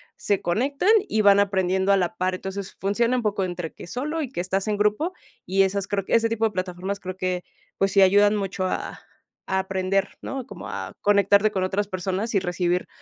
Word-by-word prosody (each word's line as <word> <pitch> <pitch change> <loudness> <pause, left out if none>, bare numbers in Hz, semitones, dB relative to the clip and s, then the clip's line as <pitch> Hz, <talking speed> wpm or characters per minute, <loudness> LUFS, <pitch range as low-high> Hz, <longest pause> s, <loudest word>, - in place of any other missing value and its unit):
se 200 -2 0
conectan 275 - 0 0.2
y 220 - +2
van 200 -1 +6
aprendiendo 190 -1 +1
a 200 - +5
la 180 -2 -1
par, 185 0 0
entonces, 190 +1 -6
funciona 235 +6 +1
un 240 - -2
poco 205 -2 0
entre 175 -2 -4
que - - -11
solo 300 - -3
y 275 - -3
que 260 - -6
estás 190 +3 -1
en 210 - 0
grupo, 210 - +1 0.3
y 195 +2 +3
esas 195 +1 -1
creo 195 -2 -2
que - - -3
ese 230 0 +3
tipo 225 0 0
de 220 - +1
plataformas 185 +1 -4
creo 185 0 -6
que, 185 -1 -2 0.3
pues, 195 0 +1
sí 195 - +5
ayudan 205 +2 +5
mucho 195 -2 -2
a - - -4 0.4
a 190 - 0
aprender, 190 +1 -1
¿no?, 270 -2 -5
como - - -9
a - - -5
conectarte 200 +1 +4
con 190 -3 -1
otras 200 +2 -1
personas 190 +4 -2
y 200 - +4
recibir 180 -1 -1
195 Hz, 210 wpm, -24 LUFS, 185-210 Hz, 0.4 s, van